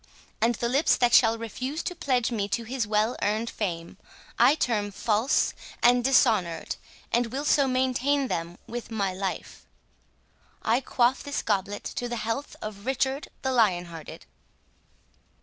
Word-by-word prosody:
And 235 +1 +3
the 235 - -1
lips 275 +6 +3
that 245 -1 +2
shall 225 -2 +6
refuse 255 +7 -4
to - - -3
pledge 255 -8 0
me 205 -4 -1
to 230 +3 -2
his 240 0 -2
well 215 +3 +1
earned 215 +3 0
fame, 170 -5 -4 0.4
I 295 - +6
term 215 -8 0
false 220 +7 +1 0.3
and 245 0 +5
dishonoured, 220 -10 +2 0.4
and 240 0 +2
will 270 +5 -4
so 285 -2 +4
maintain 260 +2 +1
them 170 -3 -3
with 240 +1 -6
my 200 -4 -1
life.—I 195 +4 -5
quaff 250 0 +2
this 285 0 -3
goblet 205 -1 -1
to 245 - -4
the 240 - -2
health 230 +5 -3
of 215 +1 -7
Richard 265 +2 0 0.2
the 265 - 0
Lion 205 -8 +3
hearted!" 160 -2 -9
235 Hz, 150 wpm, -27 LUFS, 210-260 Hz, 0.4 s, shall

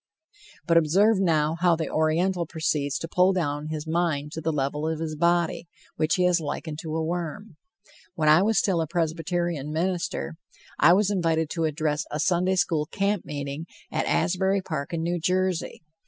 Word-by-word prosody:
But 170 -1 +4
observe 190 +7 +4
now 160 -3 +1
how 175 -1 +4
the 160 -1 -3
Oriental 170 +3 +1
proceeds 150 -3 -1
to 165 - -5
pull 180 +3 +3
down 150 -4 -2
his 155 -1 -4
mind 160 -3 -1
to 160 - -5
the 160 +1 0
level 150 +1 -1
of 160 -1 -2
his 160 -1 -3
body, 170 +1 +1 0.3
which 155 0 +1
he 180 - +1
has 180 -1 +3
likened 150 +1 -5
to 160 -1 -5
a 160 - 0
worm. 175 +3 -4 0.6
When 155 -2 0
I 155 +3 +7
was 220 +2 +2
still 180 -5 +2
a 160 - -2
Presbyterian 165 -2 -2
minister, 175 0 -2 0.4
I 170 +4 +7
was 205 +1 +3
invited 165 -5 0
to 165 -2 -1
address 155 -1 -1
a 150 - -4
Sunday 180 +3 +2
school 155 -4 +1
camp 200 +1 -1
meeting 145 +2 -5 0.2
at - - -1
Asbury 190 +1 +1
Park 155 -6 -4
in 165 -1 -2
New 175 +1 -1
Jersey. 180 0 -1
165 Hz, 180 wpm, -25 LUFS, 155-180 Hz, 0.6 s, I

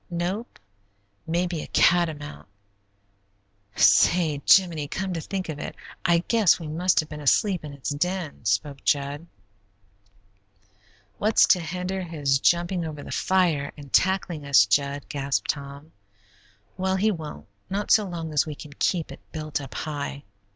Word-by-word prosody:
"Nope; 180 +7 -3 0.7
maybe 170 0 -1
a - - -8
catamount. 150 - +1 1.3
Say, 150 - +4
Jiminy, 170 -6 +5
come 190 +5 -3
to 165 - -3
think 190 +2 -4
of 155 -3 -5
it, - - -6 0.3
I 170 -2 +3
guess 220 -7 +4
we 165 - -7
must 175 +4 +1
have 155 - -11
been 150 0 -7
asleep 180 +6 +2
in 150 - -7
its 140 0 -5
den," 175 0 -3
spoke 135 +7 -1
Jud. 145 +3 0 1.9
"What's 215 +1 +4
to 180 - +5
hinder 180 +3 -4
his 145 -6 0
jumping 175 +3 +1
over 150 -3 -6
the - - -9
fire 170 -7 +1
and 140 -3 -12
tackling 185 -4 +1
us, 140 -8 +5
Jud?" 140 +6 0
gasped 140 -1 -1
Tom. 140 +2 -10 0.9
"Well, 190 0 0
he 210 +3 +2
won't, 160 -5 -7 0.2
not 200 +2 -2
so 215 - +6
long 170 -4 -5
as 150 +1 +2
we 150 - -5
can 145 0 -11
keep 170 -4 0
it - - -10
built 155 -2 -4
up 135 - -10
high. 145 -2 -4
160 Hz, 150 wpm, -25 LUFS, 145-180 Hz, 1.9 s, so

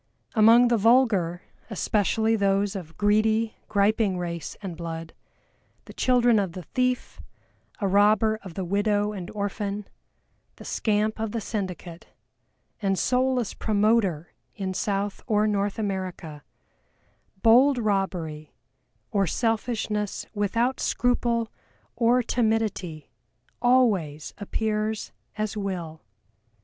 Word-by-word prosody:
Among 230 +2 +6
the 235 -2 +2
vulgar, 205 -7 +3 0.3
especially 220 +1 +1
those 200 0 +1
of 165 -4 -8
greedy, 215 +2 +2
griping 205 -1 +2
race 170 -3 -5
and 185 -4 -5
blood, 165 -1 -6 0.7
the - - -11
children 245 -3 +3
of 190 -4 -2
the 185 - -7
thief, 250 +6 -2 0.6
a 200 - 0
robber 215 +2 +3
of 185 -4 -10
the 190 - -3
widow 205 +2 +1
and 190 -3 -6
orphan, 205 0 -3 0.7
the - - -13
scamp 215 0 0
of 220 -1 -3
the 230 - -1
syndicate, 185 -6 -5 0.7
and 195 -2 +1
soulless 250 -1 +1
"promoter" 205 -6 +1 0.2
in 190 -3 -3
South 200 +1 -2
or 210 -2 +2
North 205 -1 0
America, 185 -7 -4 1.0
bold 255 +4 +6
robbery, 180 -8 -2 0.6
or 195 -2 +1
Selfishness 215 -1 -1
without 230 +5 0
scruple 235 -2 0 0.4
or 240 +1 +3
timidity 220 - -1 0.5
always 205 - +2
appears 215 +1 -2 0.3
as 215 0 -2
Will. 180 -6 -4
210 Hz, 110 wpm, -25 LUFS, 190-225 Hz, 1.0 s, Among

